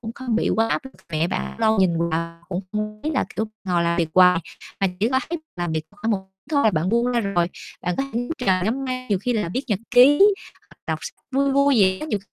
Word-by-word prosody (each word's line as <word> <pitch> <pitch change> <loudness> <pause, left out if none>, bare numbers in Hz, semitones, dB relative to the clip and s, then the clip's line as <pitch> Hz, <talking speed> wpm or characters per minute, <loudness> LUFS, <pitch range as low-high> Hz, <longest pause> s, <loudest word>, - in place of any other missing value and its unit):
cũng 225 -1 -6
không 250 -4 -2
bị - - +1
quá 225 +1 +2
áp - - -1
lực. 265 - -10 0.2
Mẹ 155 +1 +1
bạn 65 - -4
lâu 220 0 +3
nhìn 170 -2 +2
vào 165 +1 -3
cũng 180 -1 -2
không 215 0 -3
biết 310 - -1
là, - - +2
kiểu, 220 - 0 0.2
ngồi 175 -2 +1
làm 170 0 0
việc 165 -2 +1
hoài 180 -2 +6 0.4
mà 195 - +3
chỉ 220 - +3
có 260 +1 +2
thấy 340 +1 -3 0.2
làm 175 -2 -2
việc 160 -1 -1
khoảng 205 +2 -3
một 205 - +2 0.3
chút 305 - 0
thôi, 220 - +5
bạn 165 -1 0
buông 235 +3 +2
ra 245 -1 +1
rồi, 195 -5 +1 0.4
bạn 180 0 -1
có - - +1
thể 235 - 0
ngắm 245 - -5
trời, 185 -1 +2
ngắm 250 +6 -1
mây, 255 -1 -4
nhiều 200 -3 +2
khi 245 +6 -1
là 210 -7 -1
viết 260 - 0
nhật 210 -7 0
ký, 265 +4 +7 0.5
hoặc - - -18
đọc - - -1
sách - - -9
vui 275 0 +2
vui 280 0 +4
gì 190 -3 +4
đó - - -5
nhiều 210 - -1
210 Hz, 270 wpm, -23 LUFS, 175-245 Hz, 0.5 s, ký